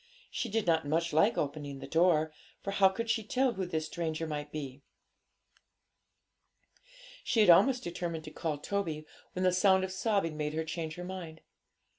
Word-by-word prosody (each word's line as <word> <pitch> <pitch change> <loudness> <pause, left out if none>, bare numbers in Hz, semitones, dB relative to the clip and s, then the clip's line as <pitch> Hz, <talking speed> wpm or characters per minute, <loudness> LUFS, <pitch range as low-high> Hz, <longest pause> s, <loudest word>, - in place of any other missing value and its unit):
She 240 - -3
did 225 +1 0
not 160 -3 +2
much 165 +2 0
like 200 +9 +4
opening 145 -1 -3
the 135 - -8
door, 160 +1 +3 0.3
for 200 - -2
how 195 -1 +5
could 230 +5 -4
she 225 -1 +1
tell 255 +3 +1
who 190 -3 -3
this 160 -3 -2
stranger 165 -1 -3
might 150 -1 -5
be? 140 -3 -6 2.4
She 225 - +2
had 200 -4 +8
almost 250 +8 +5
determined 170 -2 -4
to 155 - -9
call 155 -1 -3
Toby, 160 -2 -3 0.3
when 185 - -2
the 185 -1 +3
sound 190 +1 +4
of 190 - -3
sobbing 190 -4 0
made 150 0 -3
her 160 0 -1
change 160 0 -4
her 180 - -7
mind. 175 -4 -7
170 Hz, 175 wpm, -31 LUFS, 155-190 Hz, 2.4 s, had